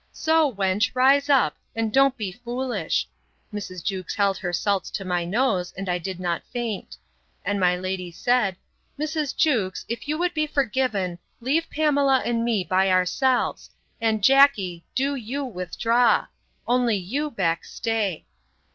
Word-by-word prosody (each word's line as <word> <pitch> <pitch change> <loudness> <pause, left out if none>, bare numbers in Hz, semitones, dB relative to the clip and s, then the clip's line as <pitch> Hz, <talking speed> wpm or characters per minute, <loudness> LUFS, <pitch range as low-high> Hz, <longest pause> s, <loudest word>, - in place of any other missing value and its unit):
So, 320 -2 +2
wench, 200 +2 +1
rise 275 +3 +4
up, 275 -3 +3 0.2
and 225 -1 -1
don't 270 0 +4
be 205 -5 -3
foolish. 245 +4 -2 0.5
Mrs. 185 -4 -6
Jewkes 190 -3 -3
held 200 -1 +2
her 175 - -3
salts 195 +2 0
to 195 - -5
my 180 -1 0
nose, 190 -2 0
and 195 0 -5
I 180 0 0
did 185 +1 -5
not 175 -2 -1
faint. 235 -4 -4 0.5
And 200 0 0
my 180 -1 +3
lady 185 -1 -4
said, 195 +3 +1 0.4
Mrs. 305 -1 -2
Jewkes, 225 - +1
if 235 +4 -5
you 305 +1 -1
would 355 +1 0
be 305 -2 0
forgiven, 220 -10 0 0.2
leave 300 +7 0
Pamela 285 -3 +2
and 230 -1 0
me 225 -5 +1
by 190 +2 +2
ourselves; 185 +8 +1 0.3
and, 220 -2 +1
Jackey, 215 -10 +4
do 275 +2 +1
you 270 +2 -4
withdraw; 230 - +1 0.4
only 245 -2 +2
you, 265 +12 -2
Beck, 170 - -1
stay. 215 -7 -2
225 Hz, 150 wpm, -24 LUFS, 185-270 Hz, 0.5 s, rise